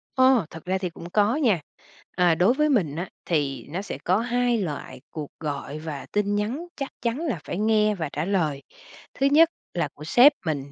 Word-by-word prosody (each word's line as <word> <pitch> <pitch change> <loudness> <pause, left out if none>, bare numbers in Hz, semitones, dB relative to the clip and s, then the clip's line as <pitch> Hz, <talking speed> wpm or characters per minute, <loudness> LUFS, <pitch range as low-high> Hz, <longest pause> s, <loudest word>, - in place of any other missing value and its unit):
Ồ, 260 -7 +5
thật 165 +1 -11
ra 185 +1 0
thì 185 -2 -3
cũng 170 +1 -10
có 210 +6 +2
nha. 230 - +2 0.6
Ờ, 175 -2 +4
đối 185 +9 +4
với 300 +2 +2
mình 180 - +1
á, 175 +2 -4 0.2
thì 145 -5 -1
nó 175 +6 -3
sẽ 200 - -6
có 185 +3 +3
2 245 0 +1
loại 150 -9 -5
cuộc 150 -3 -6
gọi 145 -1 -4
và 150 -4 -6
tin 205 0 +1
nhắn 235 +11 -2
chắc 275 -2 -4
chắn 235 +3 -1
là 295 - -2
phải - - -4
nghe 215 0 +3
và 160 -5 -3
trả 150 +3 -2
lời. 160 -8 0 0.5
Thứ 275 - 0
nhất 315 +4 +6 0.2
là 170 -4 0
của 150 - -12
sếp 250 - +6
mình, 140 -3 -2
190 Hz, 205 wpm, -25 LUFS, 160-240 Hz, 0.6 s, nhất